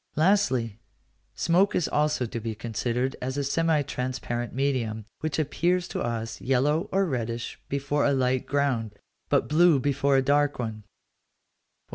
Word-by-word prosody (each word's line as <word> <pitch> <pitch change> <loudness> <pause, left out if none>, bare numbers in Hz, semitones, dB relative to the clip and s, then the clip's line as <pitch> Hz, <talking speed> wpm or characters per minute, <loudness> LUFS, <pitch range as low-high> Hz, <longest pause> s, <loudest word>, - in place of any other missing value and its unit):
Lastly, 130 - +2 0.6
smoke 180 +4 +2
is 175 - +1
also 150 -4 +1
to 115 0 -5
be 110 -1 -4
considered 120 +4 -2
as 130 +2 -3
a 140 - 0
semi 160 +1 +1
transparent 125 -3 -3
medium, 120 -6 -1
which 155 -2 -2
appears 175 +4 0
to - - -3
us 115 -1 -3
yellow 140 +5 +1
or 195 +1 +2
reddish 120 -6 -3
before 140 +1 0
a 145 - +3
light 130 -1 +1
ground, 130 -7 0 0.3
but - - +2
blue 160 -1 +5
before 140 +1 +2
a 135 - +3
dark 145 +1 +2
one. 110 -3 -5
135 Hz, 145 wpm, -26 LUFS, 120-150 Hz, 0.6 s, blue